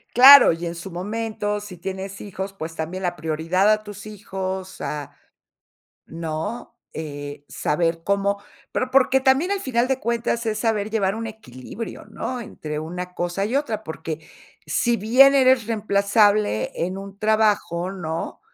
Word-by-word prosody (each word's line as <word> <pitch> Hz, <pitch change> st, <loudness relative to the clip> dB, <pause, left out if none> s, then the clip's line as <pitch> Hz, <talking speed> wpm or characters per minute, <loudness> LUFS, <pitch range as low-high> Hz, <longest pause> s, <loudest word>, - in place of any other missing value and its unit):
Claro, 270 Hz, 0 st, +10 dB
y 165 Hz, +1 st, -4 dB
en 170 Hz, -, -3 dB
su 175 Hz, +3 st, -8 dB
momento, 210 Hz, +3 st, -3 dB
si 200 Hz, -3 st, -9 dB
tienes 190 Hz, +2 st, -6 dB
hijos, 195 Hz, -1 st, -6 dB
pues, 160 Hz, -4 st, -7 dB
también 170 Hz, +4 st, -4 dB
la 175 Hz, -1 st, 0 dB
prioridad 165 Hz, +5 st, +1 dB
a 215 Hz, 0 st, +2 dB
tus 205 Hz, +1 st, -9 dB
hijos, 190 Hz, -2 st, -5 dB
a, 145 Hz, -2 st, -4 dB, 0.9 s
¿no? 165 Hz, +9 st, -5 dB, 0.2 s
Eh, 145 Hz, -2 st, -6 dB
saber 165 Hz, +1 st, -1 dB
cómo 200 Hz, +1 st, +1 dB, 0.3 s
pero 255 Hz, 0 st, -1 dB
porque 265 Hz, 0 st, +4 dB
también 265 Hz, +7 st, +3 dB
al 400 Hz, -, 0 dB
final 250 Hz, -5 st, 0 dB
de 265 Hz, -1 st, 0 dB
cuentas, 235 Hz, 0 st, -1 dB
es 215 Hz, -1 st, -1 dB
saber 215 Hz, -2 st, 0 dB
llevar 200 Hz, -3 st, 0 dB
un 225 Hz, 0 st, -4 dB
equilibrio, 215 Hz, -, -8 dB
¿no? 255 Hz, -1 st, -5 dB
Entre 150 Hz, -9 st, -6 dB
una 180 Hz, +3 st, -6 dB
cosa 175 Hz, +2 st, -2 dB
y 235 Hz, -, -2 dB
otra, 220 Hz, -7 st, -2 dB
porque 160 Hz, -2 st, -6 dB, 0.4 s
si 240 Hz, -1 st, +1 dB
bien 260 Hz, +6 st, +6 dB
eres 255 Hz, -4 st, +4 dB
reemplazable 205 Hz, -, +2 dB
en 185 Hz, +3 st, -2 dB
un 195 Hz, 0 st, -9 dB
trabajo, 210 Hz, -5 st, +1 dB
¿no? 165 Hz, -4 st, -5 dB
200 Hz, 150 wpm, -23 LUFS, 170-225 Hz, 0.9 s, Claro